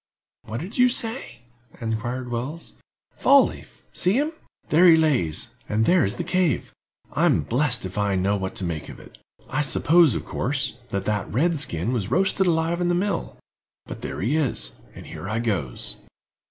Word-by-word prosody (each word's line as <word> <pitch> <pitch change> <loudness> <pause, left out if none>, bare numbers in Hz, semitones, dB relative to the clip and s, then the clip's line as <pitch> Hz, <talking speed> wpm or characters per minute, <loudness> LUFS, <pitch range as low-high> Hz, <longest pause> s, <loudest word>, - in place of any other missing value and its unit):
"What 110 +4 -5
do 200 +8 -2
you 250 - +6
say?" 230 - -4 0.4
inquired 120 +2 -3
Wells. 130 +8 -5 0.4
"Fall 280 -1 +6
leaf—see 185 - -3
him—there 270 - +1
he 165 - +9
lays, 135 - +1 0.2
and 110 +1 +1
there 180 0 +4
is 100 +4 0
the - - -3
cave. 180 -7 0 0.4
I'm - - +3
blest 125 - +1
if 95 +3 -4
I 100 -1 +1
know 95 +2 +1
what 95 -1 -4
to - - -4
make 85 -4 -4
of - - -10
it. - - -16 0.3
I 135 +3 -1
supposed, 160 0 +4
of - - -4
course, 135 -2 -2
that 100 0 -3
that 105 -2 -1
red 160 - +1
skin 105 - -1
was 105 -5 -2
roasted 190 +5 +2
alive 165 +1 +1
in 175 - +1
the 175 - +2
mill; 195 +3 -2 0.5
but - - -8
there - - -5
he 120 +10 +1
is, 150 -7 -1 0.2
and - - -10
here 95 - -7
I 110 - -1
goes." 100 - -1
130 Hz, 175 wpm, -24 LUFS, 105-175 Hz, 0.5 s, he